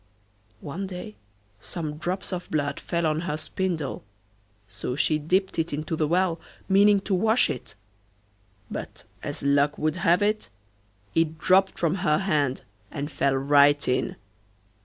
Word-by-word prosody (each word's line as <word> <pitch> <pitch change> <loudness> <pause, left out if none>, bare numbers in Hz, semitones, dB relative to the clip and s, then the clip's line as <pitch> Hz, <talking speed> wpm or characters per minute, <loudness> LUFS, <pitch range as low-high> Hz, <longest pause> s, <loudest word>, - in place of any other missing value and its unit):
One 175 +7 -5
day 180 - -7 0.4
some 155 0 -5
drops 185 +4 -3
of 180 0 -5
blood 145 -2 -1
fell 170 -1 -1
on 155 0 +1
her 170 -3 -2
spindle, 160 -2 -3 0.6
so 100 +5 -5
she 150 +2 +2
dipped 185 +5 0
it 165 -1 -1
into 155 +2 -2
the 155 -1 0
well 175 0 +1 0.3
meaning 200 +1 +5
to 200 - -2
wash 220 +6 +3
it, 120 - -7 1.0
but, - - -6 0.2
as - - -5
luck 140 +1 +3
would 155 +3 0
have 175 +2 +3
it, 215 +1 0 0.6
it 160 -1 +1
dropped 190 +4 +3
from 170 +2 +1
her 150 -5 +3
hand 150 -9 0 0.3
and 145 +1 -5
fell 140 -1 +1
right 145 +1 +4
in. 125 - 0
160 Hz, 145 wpm, -26 LUFS, 145-185 Hz, 1.0 s, meaning